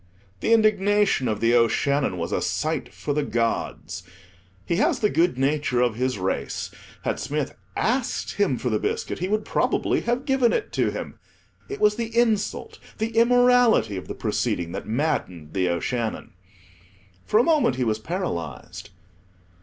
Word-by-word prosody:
The - - 0
indignation 205 - +3
of 110 -2 -2
The 115 +1 +3
O'Shannon 120 0 +2
was 85 0 -3
a - - 0
sight - - -2
for 145 - -3
the 150 - +1
gods. 115 -8 -2 0.6
He 170 - 0
has - - +2
the 210 - +2
good 170 -5 +2
nature 135 -2 +1
of 120 -2 +2
his 125 +1 -1
race: 95 0 -3 0.3
had - - -1
Smith 150 0 -3 0.2
asked 245 +3 0
him 195 -11 +1
for 125 - -2
the 105 - +1
biscuit - - -2
he 180 - -1
would 215 +2 0
probably - - +1
have 240 +3 -1
given 265 -3 +3
it 435 - -2
to - - +1
him; - - -6 0.5
it 410 - -5
was 210 +1 +3
the 230 0 -3
insult—the 220 0 -1
immorality 245 - +4
of 95 - -6
the - - -5
proceeding, 85 -1 -1
that - - -6
maddened 100 - -2
The 90 -2 +1
O'Shannon. 110 +7 -2 0.9
For 215 - +4
a - - +5
moment 300 - +3
he 130 - -1
was 110 -2 0
paralyzed. 170 - -5
150 Hz, 160 wpm, -24 LUFS, -, 0.9 s, a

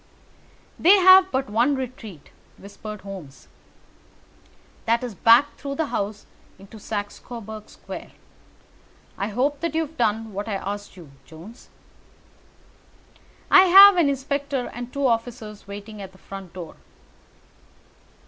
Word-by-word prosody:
"They 380 +5 +6
have 375 0 +7
but 265 +1 -1
one 235 +7 +1
retreat," 230 - -8 0.3
whispered 205 +1 -10
Holmes. 175 -10 -11 1.4
"That 230 +2 +1
is 245 -3 -5
back 230 +8 +4
through 275 -1 -6
the 320 - -1
house 205 +1 -3 0.3
into 195 +3 -14
Saxe 205 0 -5
Coburg 220 -3 -9
Square. - - -10 1.1
I 200 - -3
hope 270 +7 -1
that 335 -1 -3
you 325 - +2
have 320 0 -7
done 220 0 -1
what 205 +3 -5
I 210 - -2
asked 205 0 -6
you, 165 -6 -13
Jones?" 170 +9 -14 1.8
"I 380 - +8
have 390 +2 +9
an 335 -5 +3
inspector 280 -1 -3
and 245 0 -7
two 280 +1 -2
officers 230 -3 -3
waiting 205 +1 -9
at 190 -1 -10
the - - -18
front 195 -2 -11
door." 175 -3 -9
225 Hz, 130 wpm, -23 LUFS, 200-275 Hz, 1.8 s, have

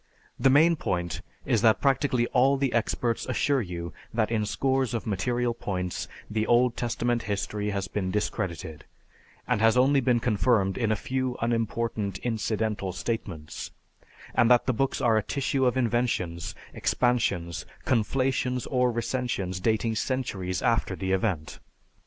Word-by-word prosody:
"The 135 - +5
main 160 +5 +5
point 85 - -2 0.2
is - - +2
that 110 -2 +5
practically 135 -1 +2
all 135 +2 +4
the 135 -2 0
experts 115 0 0
assure 135 +2 +1
you 85 -3 -5 0.2
that 110 -1 0
in 110 -2 0
scores 130 +2 0
of 115 - -3
material 120 +4 0
points 90 -5 -3 0.2
the 110 0 -1
Old 120 0 +4
Testament 120 0 -1
history 105 +1 -2
has 100 -2 -2
been 95 -1 -2
discredited, 90 -7 -3 0.6
and - - +1
has 115 +2 +5
only 135 +2 +4
been 125 -1 +3
confirmed 110 -4 +2
in 115 -3 0
a - - +3
few 130 +3 -2
unimportant 115 -3 -1
incidental 110 -4 -1
statements; 95 -7 -4 0.6
and 115 - +4
that 125 -1 +5
the 130 - +1
books 135 +3 0
are 115 -2 +4
a - - +3
tissue 135 +3 0
of 125 - +1
inventions, 115 -9 -1 0.2
expansions, 100 -9 0 0.2
conflations, 130 +1 +1
or 125 -2 +3
recensions 115 -6 -2
dating 110 +1 +1
centuries 100 -9 -2
after 115 -4 +1
the 95 0 -3
event." 95 -6 -1
115 Hz, 145 wpm, -27 LUFS, 100-125 Hz, 0.6 s, The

